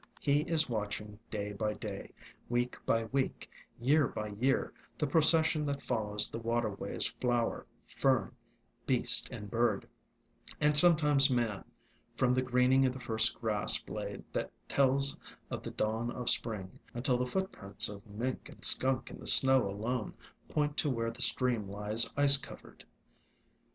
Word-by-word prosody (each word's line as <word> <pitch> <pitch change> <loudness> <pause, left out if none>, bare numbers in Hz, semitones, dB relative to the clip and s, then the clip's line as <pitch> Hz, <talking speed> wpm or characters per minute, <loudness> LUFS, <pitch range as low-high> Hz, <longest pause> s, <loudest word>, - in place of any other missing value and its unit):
He 145 0 +2
is 165 -1 +1
watching 105 -2 -4
day 105 -1 -4
by 105 +1 -2
day, 100 -2 -7 0.4
week 120 +1 -1
by 115 0 +2
week, 130 +4 -2 0.3
year 140 +3 +3
by 105 0 -5
year, 125 +7 0 0.2
the 150 - 0
procession 160 +1 +3
that 140 -1 -3
follows 105 -3 0
the - - -6
waterways 115 -3 -2
— - - -32
flower, 120 -2 -1 0.2
fern, 130 -7 0 0.6
beast 120 -2 +2
and 110 -5 -8
bird, 115 -1 0 0.7
and 150 0 +2
sometimes 150 -3 +6
man, 120 -6 -1 0.5
from 125 -1 +2
the 130 - +2
greening 130 +1 +3
of 125 - -2
the 130 - -8
first 110 -2 +2
grass 110 -3 +1
blade - - -7
that - - -3 0.2
tells 140 0 +2 0.3
of - - -4
the - - -6
dawn 110 +2 -2
of 125 0 0
Spring, 105 -5 -2 0.2
until 125 0 0
the 125 - -1
footprints 125 - -2
of 100 -1 -9
mink 115 +5 -4
and - - -6
skunk 130 -1 +3
in - - -10
the - - -8
snow 130 -5 +6
alone 110 +4 -3 0.3
point 150 -1 -1
to 150 - +1
where 115 -3 -1
the 120 +2 -10
stream 120 -7 +1
lies 105 +3 0
ice 140 0 +6
covered. - - -12
120 Hz, 155 wpm, -32 LUFS, 110-135 Hz, 0.7 s, sometimes